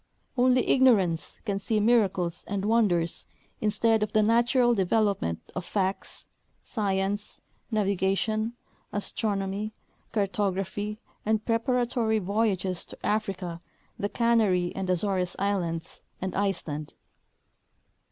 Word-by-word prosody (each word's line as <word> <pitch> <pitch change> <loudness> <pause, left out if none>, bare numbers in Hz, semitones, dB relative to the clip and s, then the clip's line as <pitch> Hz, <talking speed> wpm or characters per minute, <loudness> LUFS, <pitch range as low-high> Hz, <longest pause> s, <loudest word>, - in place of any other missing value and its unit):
Only 250 0 +3
ignorance 200 -11 +3
can 200 -3 -1
see 215 +2 0
miracles 195 -6 +2
and 200 -1 -2
wonders 200 -7 +1 0.3
instead 220 +1 +2
of 210 - -1
the 215 - +4
natural 240 +2 +4
development 195 - +1
of 180 - -3
facts, 190 +1 -2 0.4
science, 200 -1 -2 0.3
navigation, 215 +1 0 0.4
astronomy, 205 0 -1 0.4
cartography 200 0 -1 0.3
and 220 0 0
preparatory 235 -1 +1
voyages 195 -3 0
to - - -9
Africa, 195 -5 -2 0.4
the 205 - -1
Canary 215 -7 +2
and 190 -1 -3
Azores 185 0 0
islands 175 -4 -2 0.2
and 190 0 -3
Iceland. 170 -7 -2
205 Hz, 100 wpm, -27 LUFS, 190-220 Hz, 0.4 s, the